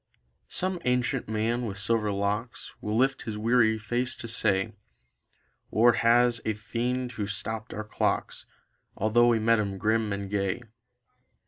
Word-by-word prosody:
Some 185 -1 -2
ancient 125 -1 0
man 115 +2 0
with 100 -2 -5
silver 105 +1 +1
locks 105 +4 -3
Will 105 +1 -1
lift 135 +2 +2
his 110 -2 -5
weary 110 0 +3
face 120 +4 -1
to 115 - -7
say: 110 -2 0 1.0
"War 120 +2 +5
was 120 0 +4
a 110 - -1
fiend 120 +3 -2
who 105 -4 -4
stopped 110 +2 -4
our 110 - -4
clocks 105 - -2 0.5
Although 110 +3 +4
we 120 -1 +4
met 115 +1 +3
him 100 -2 -2
grim 110 +2 +1
and 100 0 -3
gay." 100 +3 -1
110 Hz, 145 wpm, -27 LUFS, 105-120 Hz, 1.0 s, War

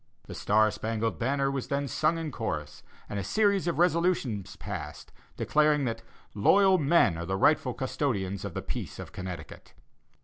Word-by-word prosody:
'The - - -8
Star 110 +1 +3
Spangled 115 +1 -2
Banner' 135 +3 +1
was 135 -2 -3
then 140 0 -1
sung 155 +6 +1
in 160 -2 -4
chorus, 75 - -4 0.3
and 100 - -4
a - - -3
series 200 - +2
of 170 - 0
resolutions 170 - +1
passed, - - -7 0.3
declaring 150 -2 +2
that 115 -1 -3 0.3
'loyal 190 - +4
men 140 - +3
are 85 - -4
the 95 0 -1
rightful 130 +1 +3
custodians 120 -8 -2
of 100 -4 -6
the - - -3
peace - - -5
of - - -8
Connecticut. 90 -1 -8
130 Hz, 165 wpm, -28 LUFS, 105-155 Hz, 0.3 s, loyal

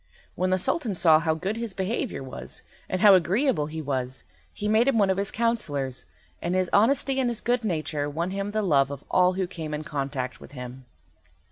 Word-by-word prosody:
When 185 +1 -1
the 185 - +3
Sultan 240 - 0
saw 160 -3 +6
how 160 -1 0
good 195 +7 -3
his 230 -4 -4
behaviour 195 - -2
was, 130 - -8 0.3
and 185 - -1
how 205 -2 +8
agreeable 190 - +2
he 160 0 -6
was, 130 -2 -3 0.3
he 210 - -4
made 220 +4 +3
him 270 -4 +3
one 200 -3 +4
of 190 - -1
his 200 0 0
counsellors, 145 - -1 0.3
and 175 +2 -1
his 185 -1 0
honesty 270 +5 +3
and 255 -2 +2
his 235 - -1
good 245 0 0
nature 155 -6 -2
won 165 +5 -2
him 195 +1 -3
the 215 +1 -1
love 140 -7 +3
of 140 -1 -7
all 180 0 +4
who 190 0 -1
came 160 -4 -5
in 150 - -5
contact 140 -4 -4
with - - -13
him. 125 0 -8
185 Hz, 210 wpm, -26 LUFS, 150-215 Hz, 0.3 s, how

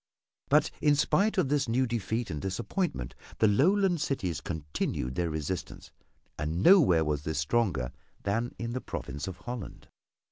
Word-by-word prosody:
But 150 +2 +4
in 145 -1 +4
spite 200 +8 +2
of 170 -8 +2
this 140 -4 +1
new 130 +3 +2
defeat 115 -2 -2
and 75 -2 -4
disappointment, 95 - -2 0.2
the 110 - +4
Lowland 175 - +3
cities 95 - -1
continued 75 -5 -3
their 85 +4 -1
resistance, 80 +3 -4 0.5
and 80 +5 -1
nowhere 130 - +6
was 75 -2 -1
this 80 0 -3
stronger 75 - 0 0.3
than 115 +4 -1
in 115 0 -4
the 130 - -3
province 70 +3 -5
of 95 -2 -6
Holland. 120 -1 -7
105 Hz, 150 wpm, -29 LUFS, -, 0.5 s, nowhere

